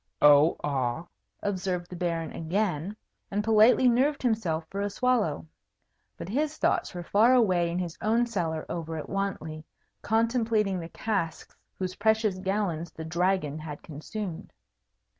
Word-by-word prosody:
"Oh 150 +2 +7
ah!" 135 +1 -1 0.4
observed 185 -3 -2
the - - -5
Baron 170 -2 -2
again, 180 +1 -2 0.3
and 205 +1 -1
politely 225 +4 +5
nerved 265 +5 +2
himself 185 -10 0
for 200 +3 -4
a 205 - 0
swallow. 230 - 0 0.7
But - - -7
his 295 +8 -1
thoughts - - 0
were 175 - -4
far 225 +8 +4
away 185 -8 +3
in 170 - -2
his 175 -2 -4
own 230 +3 +2
cellar 170 -9 -2
over 165 -1 -4
at 155 - -6
Wantley, 180 -6 -3 0.4
contemplating 225 -3 +1
the 165 -1 -7
casks 195 -7 -3 0.2
whose 185 -1 -4
precious 220 -2 +2
gallons 190 -4 -1
the 160 - -8
Dragon 170 -2 0
had 150 -2 -8
consumed. 175 +4 -6
185 Hz, 140 wpm, -28 LUFS, 165-220 Hz, 0.7 s, Oh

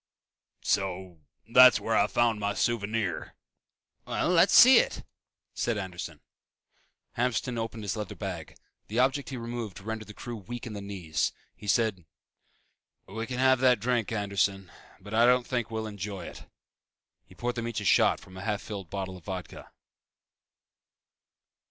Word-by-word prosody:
"So 95 -3 -1 0.3
that's 125 +1 +8
where 115 - -1
I 100 - +4
found 115 -1 +1
my 100 0 -1
souvenir." 110 -4 -1 0.7
"Well, - - -1
let's - - +5
see - - +10
it!" - - -2 0.5
said 120 -2 -1
Anderson. 90 -4 -6 1.0
Hamston 120 0 0
opened 115 -1 -4
his 100 - -2
leather 105 -3 -5
bag. 90 -6 -6 0.3
The 110 - -5
object 135 +2 +2
he 135 - -5
removed 115 -4 -5
rendered 110 +1 -5
the 105 - -11
crew 120 -1 -6
weak 115 +4 -7
in 115 - -6
the 100 - -6
knees. 95 -6 -2 0.2
He 105 - -11
said, 105 -4 +1 1.0
"We 110 +4 -5
can 125 - -4
have 130 0 +4
that 125 -3 +4
drink, 120 -1 0
Anderson, 100 -3 -1 0.3
but 105 - -10
I 115 +2 +5
don't 125 0 +4
think 120 -3 -2
we'll 110 -1 -3
enjoy 100 -2 -6
it." - - -10 0.8
He - - -19
poured 120 0 -2
them 115 -1 -4
each 115 -2 -3
a - - -6
shot - - +4
from 95 0 -14
a - - -7
half 105 0 -2
filled 100 -5 -7
bottle 95 0 -5
of 90 - -17
Vodka. 95 -2 -7
110 Hz, 160 wpm, -28 LUFS, 95-120 Hz, 1.0 s, see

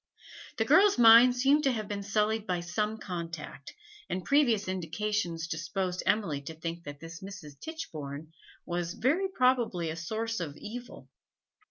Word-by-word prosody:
The - - +1
girl's 405 +1 +5
mind 240 +1 +8
seemed 275 +4 +3
to 270 - +4
have 215 -4 -3
been 205 0 -4
sullied 210 +2 0
by 180 -3 -1
some 210 +5 -2
contact, 170 -7 -7 0.4
and 180 0 -3
previous 240 -8 +3
indications 185 -1 -2
disposed 180 +3 -3
Emily 170 -10 +1
to 160 +3 -8
think 165 +1 -6
that 145 -1 -8
this 165 +3 -9
Mrs. 180 -8 -10
Tichborne 155 - -7 0.3
was 175 0 -3
very 320 - +1
probably 250 - +1
a - - -5
source 220 +6 -3
of 150 -4 -5
evil. 240 +3 -9
195 Hz, 150 wpm, -30 LUFS, 165-225 Hz, 0.4 s, mind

